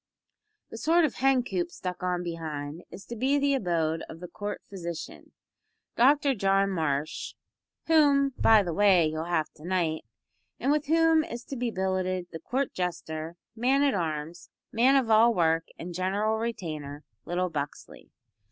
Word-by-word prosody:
The -, -, -7 dB
sort 335 Hz, +1 st, +4 dB
of 290 Hz, -, -2 dB
hen 265 Hz, -1 st, +2 dB
coop 180 Hz, -6 st, -2 dB
stuck 180 Hz, +1 st, -6 dB
on 180 Hz, -1 st, -1 dB
behind 160 Hz, -2 st, -5 dB
is 195 Hz, -, -11 dB
to 235 Hz, -, -7 dB
be 265 Hz, +5 st, +1 dB
the 280 Hz, 0 st, +2 dB
abode 165 Hz, -8 st, 0 dB
of 165 Hz, -, -9 dB
the 180 Hz, -, -7 dB
Court 205 Hz, +2 st, -6 dB
Physician, 170 Hz, -4 st, -7 dB, 0.6 s
Dr 280 Hz, +3 st, +4 dB
John 195 Hz, -2 st, +2 dB
Marsh 155 Hz, -4 st, -2 dB, 0.5 s
whom, 285 Hz, -3 st, +4 dB
by 220 Hz, -2 st, +5 dB
the 175 Hz, -3 st, -3 dB
way, 190 Hz, -2 st, +5 dB
you'll 155 Hz, +1 st, -2 dB
have 170 Hz, -3 st, -1 dB
to 150 Hz, -, -15 dB
knight 170 Hz, -3 st, -1 dB, 0.6 s
and 270 Hz, -, +1 dB
with 300 Hz, -1 st, 0 dB
whom 325 Hz, 0 st, +4 dB
is 240 Hz, -7 st, -7 dB
to 275 Hz, -, -7 dB
be 245 Hz, -1 st, -1 dB
billeted 185 Hz, -2 st, -1 dB
the 165 Hz, -, -7 dB
Court 260 Hz, -, -2 dB
Jester, 165 Hz, -2 st, -4 dB, 0.2 s
Man 260 Hz, +5 st, +2 dB
at 280 Hz, -2 st, +3 dB
Arms, 165 Hz, -1 st, -4 dB, 0.2 s
Man 250 Hz, +5 st, +4 dB
of 255 Hz, -5 st, +2 dB
all 225 Hz, +2 st, +5 dB
work 165 Hz, -1 st, +2 dB
and 175 Hz, +1 st, -7 dB
general 200 Hz, +5 st, 0 dB
retainer, 155 Hz, -11 st, -5 dB, 0.2 s
little 180 Hz, 0 st, -1 dB
Buxley. 145 Hz, -2 st, -6 dB
185 Hz, 160 wpm, -28 LUFS, 165-245 Hz, 0.6 s, by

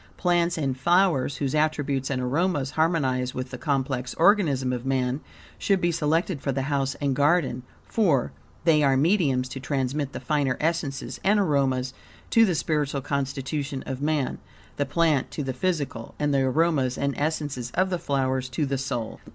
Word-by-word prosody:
Plants 175 Hz, -1 st, +1 dB
and 135 Hz, -4 st, -1 dB
flowers, 165 Hz, -2 st, +2 dB
whose 135 Hz, -2 st, -2 dB
attributes 145 Hz, -3 st, 0 dB
and 135 Hz, -2 st, -1 dB
aromas 145 Hz, +2 st, 0 dB
harmonize 135 Hz, -6 st, 0 dB
with 130 Hz, 0 st, -4 dB
the 125 Hz, -, -5 dB
complex 130 Hz, -4 st, -1 dB
organism 155 Hz, -9 st, +3 dB
of 120 Hz, -1 st, -3 dB
man, 130 Hz, +1 st, 0 dB, 0.4 s
should 195 Hz, -2 st, +2 dB
be 175 Hz, -1 st, +1 dB
selected 165 Hz, 0 st, 0 dB
for 140 Hz, -, -1 dB
the 135 Hz, 0 st, -1 dB
house 135 Hz, -1 st, -1 dB
and 140 Hz, -2 st, -1 dB
garden, 145 Hz, -3 st, +2 dB, 0.2 s
for, 165 Hz, -, +1 dB, 0.3 s
they 160 Hz, -3 st, +4 dB
are 135 Hz, -2 st, +3 dB
mediums 140 Hz, -5 st, +2 dB
to 135 Hz, -, -6 dB
transmit 140 Hz, +1 st, -2 dB
the -, -, -6 dB
finer 145 Hz, -5 st, 0 dB
essences 155 Hz, -4 st, -2 dB
and 205 Hz, +2 st, +4 dB
aromas 135 Hz, -7 st, +1 dB, 0.4 s
to 230 Hz, 0 st, +6 dB
the 180 Hz, -, +1 dB
spiritual 145 Hz, -3 st, -1 dB
constitution 140 Hz, 0 st, -3 dB
of 135 Hz, 0 st, -5 dB
man; 150 Hz, -2 st, 0 dB, 0.4 s
the 145 Hz, -, 0 dB
plant 160 Hz, -6 st, +2 dB
to 150 Hz, -, -4 dB
the 135 Hz, -1 st, -3 dB
physical, 140 Hz, -6 st, -2 dB
and 145 Hz, -1 st, 0 dB
the 135 Hz, -, +3 dB
aromas 135 Hz, -1 st, +1 dB
and 140 Hz, 0 st, 0 dB
essences 145 Hz, -5 st, -2 dB
of 185 Hz, +1 st, +2 dB
the 180 Hz, -, -1 dB
flowers 130 Hz, -3 st, -1 dB
to 145 Hz, +4 st, -1 dB
the 135 Hz, -1 st, -2 dB
soul. 120 Hz, -4 st, -4 dB
140 Hz, 170 wpm, -25 LUFS, 130-160 Hz, 0.4 s, to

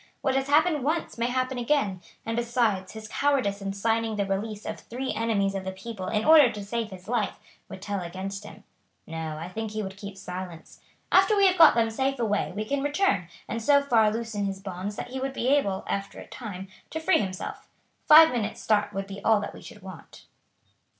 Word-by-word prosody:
What 270 Hz, -, +1 dB
has 270 Hz, 0 st, 0 dB
happened 300 Hz, -1 st, +3 dB
once 310 Hz, -3 st, -2 dB
may 235 Hz, -, +1 dB
happen 255 Hz, 0 st, -1 dB
again; 235 Hz, -8 st, 0 dB, 0.2 s
and 225 Hz, -, -2 dB
besides, 230 Hz, -5 st, 0 dB
his 220 Hz, -1 st, -8 dB
cowardice 255 Hz, -8 st, 0 dB
in 195 Hz, 0 st, -3 dB
signing 225 Hz, +2 st, 0 dB
the 200 Hz, -1 st, 0 dB
release 205 Hz, +2 st, -3 dB
of 215 Hz, -, -5 dB
three 255 Hz, +3 st, -4 dB
enemies 210 Hz, -4 st, 0 dB
of 195 Hz, -1 st, -3 dB
the 190 Hz, -, -3 dB
people 190 Hz, 0 st, -7 dB
in 215 Hz, +2 st, 0 dB
order 305 Hz, -6 st, +8 dB
to 205 Hz, -1 st, -7 dB
save 230 Hz, +1 st, -3 dB
his 185 Hz, -1 st, -11 dB
life 225 Hz, -3 st, -1 dB, 0.3 s
would 185 Hz, -, -9 dB
tell 200 Hz, -2 st, -2 dB
against 190 Hz, +3 st, -5 dB
him. 210 Hz, 0 st, -12 dB, 0.4 s
No, 160 Hz, -1 st, -5 dB
I 165 Hz, +2 st, -6 dB
think 220 Hz, +4 st, -4 dB
he 215 Hz, 0 st, -3 dB
would 190 Hz, 0 st, -7 dB
keep 200 Hz, -1 st, -8 dB
silence. 180 Hz, -3 st, -8 dB, 0.3 s
After 385 Hz, +3 st, +5 dB
we 400 Hz, -, +5 dB
have 370 Hz, -1 st, +4 dB
got 325 Hz, -6 st, +9 dB
them 225 Hz, -1 st, +2 dB
safe 270 Hz, +4 st, 0 dB
away 210 Hz, -5 st, 0 dB
we 215 Hz, +1 st, -2 dB
can 280 Hz, +4 st, -1 dB
return 290 Hz, -, +1 dB, 0.2 s
and 230 Hz, -, -3 dB
so 285 Hz, +5 st, +5 dB
far 225 Hz, -6 st, +4 dB
loosen 220 Hz, -2 st, -3 dB
his 195 Hz, -1 st, -3 dB
bonds 195 Hz, +1 st, -5 dB
that -, -, -6 dB
he 260 Hz, +1 st, -5 dB
would 270 Hz, 0 st, -3 dB
be 250 Hz, -1 st, -1 dB
able, 235 Hz, -10 st, +2 dB
after 200 Hz, 0 st, -3 dB
a -, -, -9 dB
time, 195 Hz, -5 st, -8 dB, 0.2 s
to 320 Hz, -, -4 dB
free 350 Hz, +4 st, +3 dB
himself. 190 Hz, -3 st, -5 dB, 0.4 s
Five 320 Hz, +1 st, +9 dB
minutes' 220 Hz, -4 st, -2 dB
start 210 Hz, -1 st, +1 dB
would 195 Hz, 0 st, -3 dB
be 195 Hz, 0 st, -9 dB
all 220 Hz, -2 st, +4 dB
that -, -, -5 dB
we -, -, -11 dB
should 210 Hz, -5 st, -12 dB
want." 190 Hz, -3 st, -12 dB
215 Hz, 215 wpm, -27 LUFS, 195-255 Hz, 0.4 s, got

